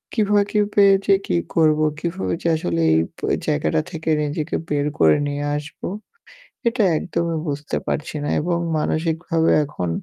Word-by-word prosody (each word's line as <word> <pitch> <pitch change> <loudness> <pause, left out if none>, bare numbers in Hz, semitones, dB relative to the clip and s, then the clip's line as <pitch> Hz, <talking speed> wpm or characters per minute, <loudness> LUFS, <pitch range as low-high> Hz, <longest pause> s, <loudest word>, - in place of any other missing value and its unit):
কিভাবে 205 -2 +3
কি 210 - +2 0.2
পেয়েছি 200 -1 +5 0.2
কি - - 0 0.2
করব 155 -2 +4 0.2
কিভাবে 170 +3 -2
যে - - -2
আসলে 85 - -1
এই 80 - +4 0.2
ব - - -15 0.3
জায়গাটা 75 - +1
থেকে 160 -2 -4
নিজেকে 150 +2 -2
বের 145 0 0
করে 80 -1 +5
নিয়ে 145 0 -3
আসবো। 150 +1 -7 0.8
এটা 230 -1 +2
একদমই 170 0 -2
বুঝতে 145 0 -3
পারছি 155 - -3
না। - - -2
এবং 170 +2 0 0.2
মানসিকভাবে 160 +1 0
এখন 90 -11 -4
160 Hz, 150 wpm, -21 LUFS, 145-175 Hz, 0.8 s, পেয়েছি